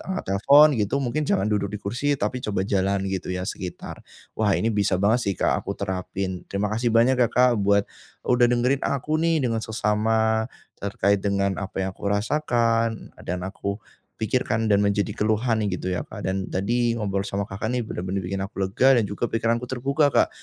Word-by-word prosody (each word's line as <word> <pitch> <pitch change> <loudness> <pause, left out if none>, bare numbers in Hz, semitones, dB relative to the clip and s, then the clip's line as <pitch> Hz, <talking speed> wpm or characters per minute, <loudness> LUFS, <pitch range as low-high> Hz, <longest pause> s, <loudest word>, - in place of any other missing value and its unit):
angkat - - -3 0.2
telepon 145 +7 +8
gitu, 105 +5 0
mungkin 140 +4 -1
jangan 100 +3 +1
duduk 100 -1 0
di 105 - -6
kursi, 135 +8 0
tapi 130 -1 -2
coba 100 -5 -2
jalan 95 0 0
gitu 95 -2 -3
ya, 90 0 -3
sekitar. 90 -3 -6 0.4
Wah, 105 -3 +3
ini 115 - 0
bisa 100 -2 +1
banget 100 +6 +2
sih, 100 - +1
Kak, - - +1
aku - - -5
terapin. 95 -1 -4
Terima 100 +1 -2
kasih 115 +1 0
banyak 125 +3 +4
ya, 120 - +5
Kak, 125 -1 +3
buat 100 0 +3 0.4
sudah 125 -1 +4
dengerin 125 +3 +2
aku 150 +3 -1
nih 165 -3 +2
dengan 115 -2 0
seksama, 110 0 +1 0.3
terkait 100 0 +1
dengan 100 -1 0
apa 95 -1 -3
yang 95 - -2
aku 100 - -6
rasakan 115 0 0
dan 90 +1 -3
aku 100 +1 -4 0.4
pikirkan 110 0 -1
dan 100 - +4
menjadi 100 0 +1
keluhan 110 +1 +1
gitu 90 -1 -3
ya, 90 -5 -2
Kak, - - -9
dan 95 0 -1
tadi 115 +5 0
ngobrol 100 -3 -2
sama 100 +1 -2
Kakak 95 +3 -4
nih 125 - 0
bener-bener 95 -2 -4
bikin 95 +2 -3
aku 100 0 -7
lega 130 +8 +4
dan 120 - +3
juga 100 +3 -3
pikiranku 115 +2 0
terbuka, 140 +4 +1
Kak. - - +4
105 Hz, 190 wpm, -24 LUFS, 100-120 Hz, 0.4 s, telepon